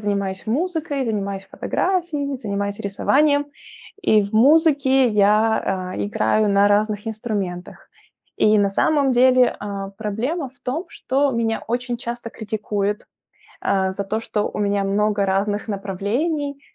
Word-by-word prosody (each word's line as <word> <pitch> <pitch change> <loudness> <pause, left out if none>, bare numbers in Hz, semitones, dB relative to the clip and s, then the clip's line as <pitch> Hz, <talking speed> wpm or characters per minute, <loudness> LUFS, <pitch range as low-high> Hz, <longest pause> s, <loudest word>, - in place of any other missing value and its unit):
занимаюсь 200 -1 -2
музыкой, 295 +1 -1
занимаюсь 200 -3 -3
фотографией, 325 -7 -1
занимаюсь 200 -4 -3
рисованием. 285 +8 +2 0.6
И 215 - +4
в 200 - -6
музыке 270 +1 +4
я, 210 -3 +2
а, - - -6
играю 110 - +1
на 200 0 +4
разных 210 +1 +1
инструментах. 205 -5 -5 0.5
И, 215 0 +4
на 200 -1 +3
самом 280 +6 +2
деле, 255 0 +4
а, 200 -1 -5
проблема 230 - -3
в 260 - -27
том, 305 +9 -3
что 275 +2 0
меня 230 -2 -1
очень 245 +1 -2
часто 240 0 -5
критикуют, 210 -2 -3 0.6
а, 190 -1 +1
за 200 +1 -4
то, 215 +3 -2
что 210 -2 -2
у - - -8
меня 200 -1 +1
много 205 +1 +1
разных 205 +2 -1
направлений, 245 - -2
215 Hz, 135 wpm, -21 LUFS, 200-265 Hz, 0.6 s, И